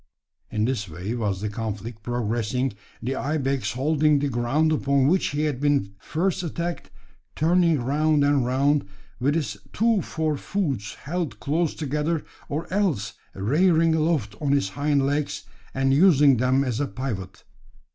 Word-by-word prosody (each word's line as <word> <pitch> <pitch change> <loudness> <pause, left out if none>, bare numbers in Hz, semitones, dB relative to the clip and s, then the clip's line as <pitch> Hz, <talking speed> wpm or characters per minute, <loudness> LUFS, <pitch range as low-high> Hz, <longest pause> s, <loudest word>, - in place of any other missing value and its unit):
In 105 0 0
this 115 -6 -2
way 90 +8 -5
was 105 -5 -2
the 105 - -2
conflict 110 +1 -5
progressing, 120 +2 -1 0.3
the 130 +3 -1
ibex 140 -2 -1
holding 150 +3 +2
the 140 0 0
ground 135 +6 +1
upon 140 -3 +2
which 180 +7 +3
he 145 +1 -1
had 145 -4 -1
been 140 -9 +1
first 175 - -1
attacked, 170 - -4 0.5
turning 165 0 +3
round 145 +4 +2
and 145 -2 +3
round, 140 +3 +2 0.3
with 140 +4 +1
his 160 -4 -2 0.2
two 225 -2 +2
fore 155 -2 -2
hoofs 135 - -2
held 170 +1 -4
close 155 +3 0
together, 150 +2 -1 0.2
or 150 +3 -2
else 180 - 0 0.2
rearing 160 - +3
aloft 155 -9 +1
on 140 -2 +1
his 140 -9 +1
hind 140 +3 +1
legs, 145 +1 -1 0.3
and 135 0 +1
using 145 -4 +6
them 130 +3 +2
as 125 -4 -2
a 145 - 0
pivot. 100 -9 -5
140 Hz, 150 wpm, -24 LUFS, 120-155 Hz, 0.5 s, using